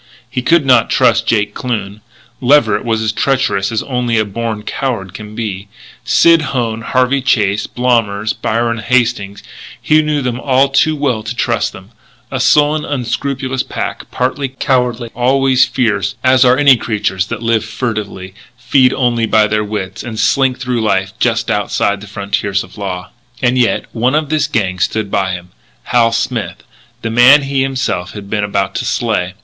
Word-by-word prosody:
He 125 Hz, -, -3 dB
could 165 Hz, +3 st, +3 dB
not 125 Hz, -4 st, +4 dB
trust 115 Hz, -3 st, +2 dB
Jake 105 Hz, -3 st, +1 dB
Kloon; 110 Hz, -4 st, -4 dB, 0.4 s
Leverett 120 Hz, -6 st, +3 dB
was 110 Hz, -2 st, -1 dB
as 110 Hz, -, 0 dB
treacherous 115 Hz, -6 st, 0 dB
as 110 Hz, -, -1 dB
only 125 Hz, -3 st, -1 dB
a 110 Hz, -, +2 dB
born 110 Hz, +1 st, -4 dB
coward 105 Hz, -8 st, -3 dB
can 105 Hz, +1 st, -9 dB
be; 100 Hz, -3 st, -4 dB, 0.4 s
Sid 165 Hz, +8 st, +4 dB
Hone, 120 Hz, -6 st, -2 dB
Harvey 130 Hz, +3 st, +1 dB
Chase, 105 Hz, -6 st, +1 dB
Blommers, 110 Hz, -4 st, 0 dB
Byron 115 Hz, +1 st, -1 dB
Hastings, 115 Hz, -4 st, 0 dB, 0.4 s
he 155 Hz, 0 st, +3 dB
knew 150 Hz, -2 st, -1 dB
them 125 Hz, -1 st, -2 dB
all 135 Hz, 0 st, +2 dB
too 155 Hz, +3 st, +2 dB
well 135 Hz, -7 st, -1 dB
to 110 Hz, +2 st, -6 dB
trust 120 Hz, -2 st, 0 dB
them, 95 Hz, +3 st, -13 dB, 0.4 s
a -, -, -2 dB
sullen, 150 Hz, +1 st, +3 dB
unscrupulous 130 Hz, -1 st, -2 dB
pack, -, -, -5 dB
partly 135 Hz, +2 st, -1 dB
cowardly, 125 Hz, -3 st, -1 dB
always 130 Hz, +1 st, +3 dB
fierce, 105 Hz, -5 st, -1 dB
as 130 Hz, 0 st, +5 dB
are 125 Hz, 0 st, +4 dB
any 140 Hz, -3 st, +6 dB
creatures 100 Hz, -4 st, -2 dB
that -, -, -5 dB
live 115 Hz, -2 st, +1 dB
furtively, 105 Hz, -6 st, -5 dB, 0.2 s
feed 125 Hz, +1 st, +3 dB
only 120 Hz, -3 st, 0 dB
by 110 Hz, 0 st, +4 dB
their 105 Hz, 0 st, 0 dB
wits, 105 Hz, -3 st, -5 dB
and 110 Hz, -2 st, -6 dB
slink 130 Hz, +4 st, +2 dB
through 125 Hz, -2 st, -2 dB
life 95 Hz, -2 st, 0 dB
just 115 Hz, -1 st, 0 dB
outside 100 Hz, -1 st, 0 dB
the 105 Hz, -, -10 dB
frontiers 100 Hz, -1 st, -2 dB
of -, -, -15 dB
law. 95 Hz, -3 st, -5 dB, 0.3 s
And 125 Hz, -1 st, +1 dB
yet, 125 Hz, -2 st, +1 dB
one 125 Hz, +5 st, +1 dB
of 155 Hz, -2 st, 0 dB
this 155 Hz, -1 st, +1 dB
gang 95 Hz, -4 st, -1 dB
had -, -, -7 dB
stood 110 Hz, 0 st, -1 dB
by 95 Hz, -1 st, 0 dB
him 90 Hz, 0 st, -7 dB, 0.3 s
Hal 115 Hz, -1 st, +2 dB
Smith 115 Hz, -1 st, -3 dB, 0.4 s
the 115 Hz, -, -2 dB
man 130 Hz, +5 st, +6 dB
he 135 Hz, -1 st, -1 dB
himself 130 Hz, -9 st, -2 dB
had 100 Hz, -1 st, -9 dB
been 105 Hz, -1 st, 0 dB
about 100 Hz, -1 st, -1 dB
to 125 Hz, -, -3 dB
slay. 105 Hz, -6 st, -1 dB
115 Hz, 170 wpm, -15 LUFS, 105-130 Hz, 0.4 s, any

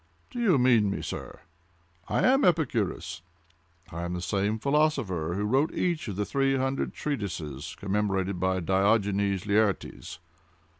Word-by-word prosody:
Do 245 Hz, -, -5 dB
you 200 Hz, -10 st, +4 dB
mean 120 Hz, -5 st, +4 dB
me, 100 Hz, -, -3 dB
sir?—I 85 Hz, 0 st, -7 dB
am 270 Hz, +2 st, +4 dB
Epicurus! 120 Hz, -, 0 dB, 0.7 s
I 85 Hz, -, -5 dB
am 85 Hz, 0 st, -3 dB
the 90 Hz, -, -4 dB
same 100 Hz, +3 st, 0 dB
philosopher 110 Hz, -, 0 dB
who 100 Hz, -, -1 dB
wrote 135 Hz, +9 st, +1 dB
each 170 Hz, -7 st, -1 dB
of 100 Hz, -, -4 dB
the 105 Hz, +1 st, -1 dB
three 135 Hz, +1 st, +1 dB
hundred 135 Hz, +1 st, -1 dB
treatises 85 Hz, -, -4 dB
commemorated 100 Hz, -2 st, -1 dB
by 95 Hz, 0 st, 0 dB
Diogenes 100 Hz, +1 st, +1 dB
Laertes." 105 Hz, -5 st, 0 dB
100 Hz, 135 wpm, -27 LUFS, 90-135 Hz, 0.7 s, you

